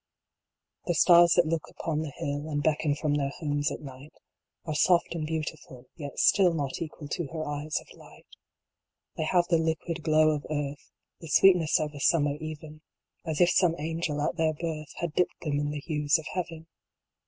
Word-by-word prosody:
The 175 Hz, -, +1 dB
stars 175 Hz, +1 st, +6 dB
that 175 Hz, -, +4 dB
look 160 Hz, 0 st, -2 dB
upon 155 Hz, -2 st, -3 dB
the 160 Hz, -, -4 dB
hill, 145 Hz, +2 st, -3 dB
And 145 Hz, -1 st, -2 dB
beckon 150 Hz, -1 st, +1 dB
from 150 Hz, 0 st, -1 dB
their 140 Hz, -1 st, 0 dB
homes 145 Hz, -1 st, -2 dB
at -, -, -6 dB
night, 135 Hz, +1 st, -11 dB, 0.5 s
Are 155 Hz, -, -3 dB
soft 170 Hz, +3 st, +3 dB
and 160 Hz, -2 st, -3 dB
beautiful, 155 Hz, -5 st, -5 dB
yet 145 Hz, -4 st, -8 dB
still 180 Hz, -4 st, +4 dB
Not 140 Hz, -2 st, -3 dB
equal 155 Hz, -2 st, -6 dB
to 170 Hz, -1 st, -3 dB
her 155 Hz, +1 st, -5 dB
eyes 145 Hz, +1 st, -2 dB
of -, -, -17 dB
light -, -, -17 dB, 0.9 s
They 155 Hz, -, -2 dB
have 175 Hz, +2 st, +3 dB
the 165 Hz, -2 st, +3 dB
liquid 160 Hz, +1 st, -2 dB
glow 155 Hz, 0 st, +4 dB
of 150 Hz, -1 st, -3 dB
earth, 145 Hz, -2 st, -4 dB, 0.3 s
The 165 Hz, -, -10 dB
sweetness 175 Hz, +1 st, +5 dB
of 155 Hz, -1 st, -3 dB
a 145 Hz, -, -8 dB
summer 145 Hz, -1 st, +2 dB
even, 155 Hz, 0 st, -8 dB, 0.5 s
As 160 Hz, +1 st, -1 dB
if 175 Hz, -, +5 dB
some 175 Hz, -3 st, +3 dB
Angel 160 Hz, 0 st, -3 dB
at -, -, -4 dB
their 160 Hz, -1 st, +2 dB
birth 155 Hz, -2 st, -5 dB
Had 170 Hz, -3 st, -4 dB
dipped 180 Hz, -, 0 dB
them 145 Hz, -3 st, -1 dB
in 145 Hz, 0 st, -1 dB
the 145 Hz, -1 st, -4 dB
hues 150 Hz, -1 st, +1 dB
of 160 Hz, -, -9 dB
Heaven. 165 Hz, -3 st, -4 dB
155 Hz, 190 wpm, -28 LUFS, 145-165 Hz, 0.9 s, stars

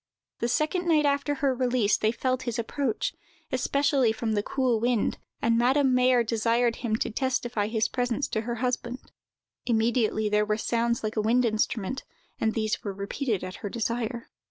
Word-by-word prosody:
The 235 Hz, -, 0 dB
second 310 Hz, +7 st, 0 dB
night 310 Hz, -3 st, +4 dB
after 285 Hz, +1 st, +1 dB
her 280 Hz, -3 st, +1 dB
release, 250 Hz, -4 st, +2 dB
they 220 Hz, -, +1 dB
felt 255 Hz, +2 st, -1 dB
his 240 Hz, -1 st, -3 dB
approach, 235 Hz, 0 st, -1 dB, 0.4 s
especially 275 Hz, -1 st, +2 dB
from 220 Hz, 0 st, -2 dB
the 210 Hz, -1 st, +1 dB
cool 250 Hz, 0 st, 0 dB
wind, 240 Hz, -1 st, 0 dB, 0.2 s
and 230 Hz, 0 st, +3 dB
Madame 260 Hz, +2 st, +3 dB
Mayer 250 Hz, -1 st, +4 dB
desired 230 Hz, +1 st, +1 dB
him 225 Hz, -3 st, -1 dB
to 225 Hz, -, -2 dB
testify 240 Hz, -3 st, -1 dB
his 220 Hz, 0 st, +1 dB
presence 245 Hz, +2 st, -1 dB
to 220 Hz, -, -1 dB
her 235 Hz, +1 st, -3 dB
husband. 250 Hz, +1 st, -3 dB, 0.6 s
Immediately 225 Hz, -2 st, +2 dB
there 210 Hz, 0 st, +2 dB
were 210 Hz, 0 st, 0 dB
sounds 235 Hz, +1 st, 0 dB
like 215 Hz, +1 st, -3 dB
a -, -, +3 dB
wind 240 Hz, +3 st, +3 dB
instrument, 220 Hz, +2 st, -1 dB, 0.4 s
and 220 Hz, -1 st, 0 dB
these 215 Hz, -1 st, -1 dB
were 200 Hz, -, -3 dB
repeated 200 Hz, +1 st, -2 dB
at 185 Hz, 0 st, -6 dB
her 205 Hz, -, -5 dB
desire. 235 Hz, +2 st, -3 dB
235 Hz, 175 wpm, -27 LUFS, 220-255 Hz, 0.6 s, night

